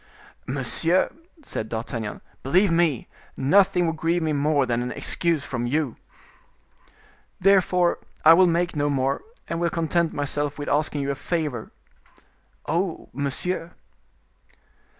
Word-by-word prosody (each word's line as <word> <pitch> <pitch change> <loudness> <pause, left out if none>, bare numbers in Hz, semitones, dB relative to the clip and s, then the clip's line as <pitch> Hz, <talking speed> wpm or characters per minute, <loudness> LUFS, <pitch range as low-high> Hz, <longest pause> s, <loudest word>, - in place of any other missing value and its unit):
"Monsieur," 145 +7 +1 0.3
said 110 - -5
D'Artagnan, 110 -1 -4 0.2
"believe 180 +8 +3
me, 165 -7 +1 0.3
nothing 180 +5 +4
would 165 -1 -1
grieve 165 +2 0
me 155 -1 0
more 145 -1 +2
than 120 -1 0
an 125 0 -3
excuse 165 0 0
from 120 -3 -3
you." 145 -2 -1 1.4
"Therefore 180 -2 +3 0.3
I 160 - +10
will 180 +2 +6
make 175 0 0
no 145 0 +1
more, 135 -1 0 0.3
and 170 - -3
will 170 0 +1
content 165 0 0
myself 145 0 -2
with 145 - -4
asking 150 0 0
you 140 0 -1
a - - -3
favor." 145 -7 -3 0.9
"Oh, 170 +2 -2
monsieur." 165 +6 -2
155 Hz, 130 wpm, -24 LUFS, 135-170 Hz, 1.4 s, I